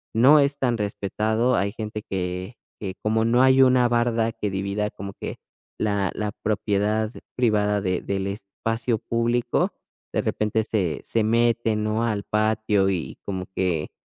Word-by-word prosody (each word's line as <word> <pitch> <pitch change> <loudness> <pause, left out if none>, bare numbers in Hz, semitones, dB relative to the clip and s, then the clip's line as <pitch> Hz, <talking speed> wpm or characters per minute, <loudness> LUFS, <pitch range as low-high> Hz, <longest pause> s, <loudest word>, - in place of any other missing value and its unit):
no 135 +7 +7
es 140 0 +2
tan 120 -3 +1
respetado, 110 +3 0
hay 100 0 +1
gente 105 -1 -5
que 90 +3 -3 0.2
que 95 -3 -5
como 110 +1 +2
no 120 +2 +4
hay 130 0 +6
una 125 -1 +5
barda 120 -1 +1
que 105 -3 -3
divida 100 +2 -1
como 100 0 -7
que - - -6 0.4
la 100 -3 0
la 105 -1 -2
propiedad 105 +1 0 0.2
privada 105 -4 +2
de 90 -2 -1
del 100 0 -2
espacio 110 +4 -2
público, 120 +1 0 0.4
de - - +1
repente 110 +1 0
se 90 -9 -1
se 115 - 0
mete, 115 0 +2
¿no?, 110 +1 0
al 105 -3 -1
patio 105 -2 +1
y 90 -4 -3
como 95 -2 -3
que 85 -5 -1
110 Hz, 155 wpm, -24 LUFS, 100-115 Hz, 0.4 s, no